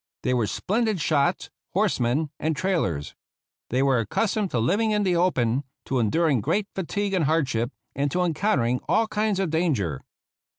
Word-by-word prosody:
They 125 Hz, -, +1 dB
were 120 Hz, -4 st, +1 dB
splendid 215 Hz, -, 0 dB
shots, 155 Hz, +3 st, +1 dB, 0.2 s
horsemen, 150 Hz, -, +1 dB
and 160 Hz, 0 st, 0 dB
trailers. 95 Hz, -, -1 dB, 0.6 s
They 130 Hz, +3 st, +1 dB
were 135 Hz, -3 st, +3 dB
accustomed 200 Hz, -, 0 dB
to 125 Hz, -, -2 dB
living 200 Hz, -, +2 dB
in 210 Hz, -1 st, +1 dB
the 185 Hz, -2 st, +2 dB
open, 135 Hz, -8 st, +1 dB, 0.2 s
to 130 Hz, -, 0 dB
enduring 135 Hz, +3 st, +2 dB
great 205 Hz, -, 0 dB
fatigue 195 Hz, +2 st, -2 dB
and 180 Hz, -5 st, +2 dB
hardship, 135 Hz, -7 st, +1 dB, 0.2 s
and 140 Hz, +1 st, 0 dB
to 180 Hz, +6 st, 0 dB
en 170 Hz, -2 st, +1 dB
countering 130 Hz, -, +1 dB
all 225 Hz, -, +3 dB
kinds 210 Hz, -2 st, 0 dB
of 190 Hz, -5 st, 0 dB
danger. 130 Hz, -, 0 dB
160 Hz, 165 wpm, -25 LUFS, 125-195 Hz, 0.6 s, were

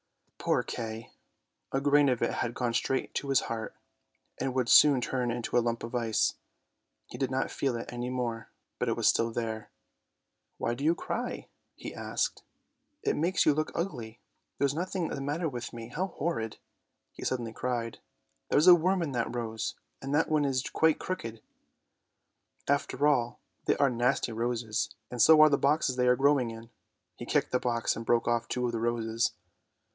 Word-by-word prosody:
Poor -, -, +1 dB
Kay! 115 Hz, -1 st, -6 dB, 0.6 s
a 135 Hz, -, +1 dB
grain 145 Hz, 0 st, +4 dB
of 125 Hz, -2 st, 0 dB
it -, -, +1 dB
had 120 Hz, -1 st, -2 dB
gone 120 Hz, -2 st, -1 dB
straight 130 Hz, +2 st, -1 dB
to 140 Hz, -, -3 dB
his 135 Hz, -, +4 dB
heart, 115 Hz, -1 st, -5 dB, 0.6 s
and 130 Hz, 0 st, -2 dB
would 130 Hz, -2 st, +1 dB
soon 145 Hz, -3 st, +7 dB
turn 125 Hz, 0 st, -1 dB
it 120 Hz, 0 st, -3 dB
to 110 Hz, -, -3 dB
a 120 Hz, -, +5 dB
lump 115 Hz, 0 st, -2 dB
of 115 Hz, -, -6 dB
ice. 115 Hz, -3 st, +1 dB, 0.7 s
He -, -, -10 dB
did 135 Hz, -, 0 dB
not 130 Hz, 0 st, -1 dB
feel 135 Hz, -3 st, -1 dB
it 115 Hz, +1 st, -6 dB
any 120 Hz, +1 st, -3 dB
more, 120 Hz, -3 st, -3 dB, 0.3 s
but -, -, 0 dB
it -, -, +1 dB
was -, -, +2 dB
still 115 Hz, -, +3 dB
there. 110 Hz, -2 st, -4 dB, 0.5 s
" -, -, -52 dB
Why 120 Hz, -, -1 dB
do 130 Hz, +4 st, -6 dB
you 165 Hz, +3 st, +3 dB
cry? -, -, -4 dB
" -, -, -50 dB
he -, -, -8 dB
asked; -, -, -2 dB, 0.3 s
" 295 Hz, 0 st, -49 dB
it -, -, +1 dB
makes 175 Hz, +5 st, +1 dB
you 150 Hz, -, +5 dB
look 155 Hz, +2 st, -1 dB
ugly; 120 Hz, -, -4 dB, 0.4 s
there's 140 Hz, -1 st, +1 dB
nothing 180 Hz, +1 st, -2 dB
the -, -, -4 dB
matter 150 Hz, +5 st, -1 dB
with 120 Hz, -5 st, -5 dB
me. 115 Hz, -1 st, -8 dB
How 180 Hz, +10 st, -2 dB
horrid! 150 Hz, -, -3 dB, 0.3 s
" -, -, -53 dB
he -, -, -9 dB
suddenly 120 Hz, -3 st, -2 dB
cried; 120 Hz, -1 st, -3 dB, 0.3 s
" -, -, -48 dB
there's 150 Hz, -, +4 dB
a 180 Hz, -, +11 dB
worm 180 Hz, +2 st, +2 dB
in 150 Hz, -, -3 dB
that 120 Hz, -1 st, -2 dB
rose, 115 Hz, -1 st, -3 dB, 0.3 s
and 135 Hz, +2 st, -2 dB
that 160 Hz, -, +2 dB
one 155 Hz, -2 st, +2 dB
is 130 Hz, -2 st, 0 dB
quite 160 Hz, +2 st, +2 dB
crooked; 115 Hz, -12 st, -5 dB, 1.2 s
after 140 Hz, 0 st, +1 dB
all, 120 Hz, -5 st, +1 dB, 0.3 s
they -, -, +2 dB
are 140 Hz, -2 st, +3 dB
nasty 120 Hz, +1 st, +1 dB
roses, 115 Hz, -1 st, -1 dB, 0.2 s
and 125 Hz, -1 st, -1 dB
so 160 Hz, +4 st, +8 dB
are 155 Hz, -, +8 dB
the 140 Hz, -, +2 dB
boxes 140 Hz, -2 st, +2 dB
they 125 Hz, 0 st, +2 dB
are 125 Hz, -, +6 dB
growing 135 Hz, -2 st, +3 dB
in! 115 Hz, +1 st, -10 dB, 0.2 s
" -, -, -53 dB
He -, -, -7 dB
kicked -, -, +1 dB
the 125 Hz, -, +2 dB
box 120 Hz, -2 st, 0 dB
and 115 Hz, -, -5 dB
broke 115 Hz, 0 st, +2 dB
off 120 Hz, -1 st, +1 dB
two 125 Hz, 0 st, -1 dB
of 120 Hz, -, 0 dB
the 115 Hz, -, -2 dB
roses. 115 Hz, 0 st, 0 dB
125 Hz, 200 wpm, -29 LUFS, 115-145 Hz, 1.2 s, a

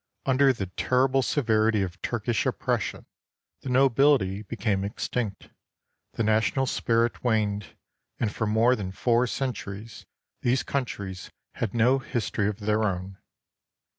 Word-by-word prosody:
Under 135 Hz, +1 st, +4 dB
the 110 Hz, -6 st, -3 dB
terrible 130 Hz, +8 st, +1 dB
severity 110 Hz, -5 st, +2 dB
of 90 Hz, -1 st, -6 dB
Turkish 120 Hz, -1 st, -1 dB
oppression, -, -, -2 dB, 0.6 s
the 135 Hz, -, -6 dB
nobility 130 Hz, -6 st, +3 dB
became 100 Hz, -1 st, -1 dB
extinct, 100 Hz, 0 st, -4 dB, 0.6 s
the 115 Hz, -, -1 dB
national 110 Hz, +5 st, +2 dB
spirit 115 Hz, -1 st, 0 dB
waned, 105 Hz, -6 st, 0 dB, 0.4 s
and 105 Hz, -3 st, -1 dB
for 110 Hz, -, -1 dB
more 115 Hz, +4 st, +4 dB
than 100 Hz, -5 st, -5 dB
four 115 Hz, +8 st, +2 dB
centuries 115 Hz, -5 st, -5 dB, 0.3 s
these 125 Hz, +2 st, +1 dB
coun 140 Hz, -2 st, -1 dB
tries 95 Hz, -5 st, -7 dB, 0.2 s
had 115 Hz, -3 st, -3 dB
no 125 Hz, +4 st, +4 dB
history 115 Hz, -5 st, -2 dB
of 105 Hz, +1 st, -6 dB
their 105 Hz, +1 st, +1 dB
own. 95 Hz, -1 st, -3 dB
110 Hz, 130 wpm, -26 LUFS, 100-125 Hz, 0.6 s, Under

